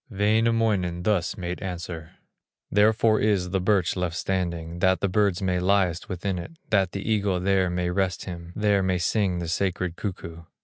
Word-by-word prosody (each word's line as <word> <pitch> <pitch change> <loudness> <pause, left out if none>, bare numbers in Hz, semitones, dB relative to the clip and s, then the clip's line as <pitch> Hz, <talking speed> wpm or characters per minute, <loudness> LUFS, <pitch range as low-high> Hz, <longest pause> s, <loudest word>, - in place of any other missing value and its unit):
Wainamoinen 105 -4 +1
thus 95 -3 0
made 90 -1 -4
answer: 85 -3 -6 0.6
"Therefore 110 +1 +4
is 100 -4 +1
the 95 -1 0
birch 95 -3 +2
left 90 -3 -2
standing, 85 -3 -2
That 95 0 +3
the 100 - +1
birds 100 -1 +1
may 90 -1 +1
nest 90 -2 +1
within 95 0 -2
it, 85 - -8 0.2
That 95 -4 +2
the 100 +1 -5
eagle 100 -4 +1
there 95 0 +2
may 90 0 -1
rest 95 0 -1
him, 85 -2 -7
There 105 -2 +2
may 95 -1 +1
sing 90 +1 0
the 85 -1 -4
sacred 90 0 -1
cuckoo." 85 -4 -6
95 Hz, 170 wpm, -25 LUFS, 90-100 Hz, 0.6 s, Therefore